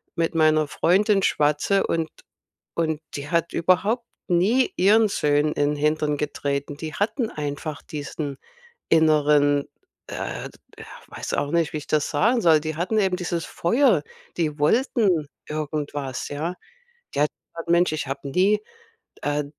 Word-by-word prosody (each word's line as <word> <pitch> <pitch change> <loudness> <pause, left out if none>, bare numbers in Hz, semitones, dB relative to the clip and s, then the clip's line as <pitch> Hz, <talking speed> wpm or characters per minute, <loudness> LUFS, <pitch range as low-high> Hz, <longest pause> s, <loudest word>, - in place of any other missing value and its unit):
mit 165 0 -1
meiner 155 -1 +4
Freundin 195 +7 +2
schwatze 150 +7 +2
und 165 -1 -1 0.7
und 160 -2 -1
die 145 0 -5
hat 170 -1 +1
überhaupt 200 +8 +1 0.2
nie 200 +9 +3
ihren 215 +4 +5
Söhnen 150 -4 +1
in 145 0 +1
'n - - -3
Hintern 150 0 +1
getreten, 145 -1 -3
die 155 +1 -6
hatten 225 +3 -1
einfach 145 0 -5
diesen 145 -1 -5 0.5
inneren, 150 -2 +4 0.4
äh, - - -5
d - - -21 0.2
ja, - - -10 0.2
weiß - - -5
auch 145 - -1
nicht, 165 -2 +1
wie - - -3
ich 145 - -9
das 150 -1 +1
sagen 230 +11 +2
soll, 160 -3 +5
die 155 0 -4
hatten 185 +7 0
eben 190 -3 +2
dieses 175 -2 -3
Feuer, 215 - +2 0.3
die 155 -3 -1
wollten 195 - +2 0.2
irgendwas, 145 -3 -4
ja? 155 +5 -3 0.6
Die - - 0
hat 150 - +3 0.2
gesagt: 170 0 -6
„Mensch, 170 -1 +4
ich 155 -2 -2
habe 140 +1 -5
nie, 195 +8 +3 0.6
äh, 145 0 0
155 Hz, 150 wpm, -24 LUFS, 145-180 Hz, 0.7 s, ihren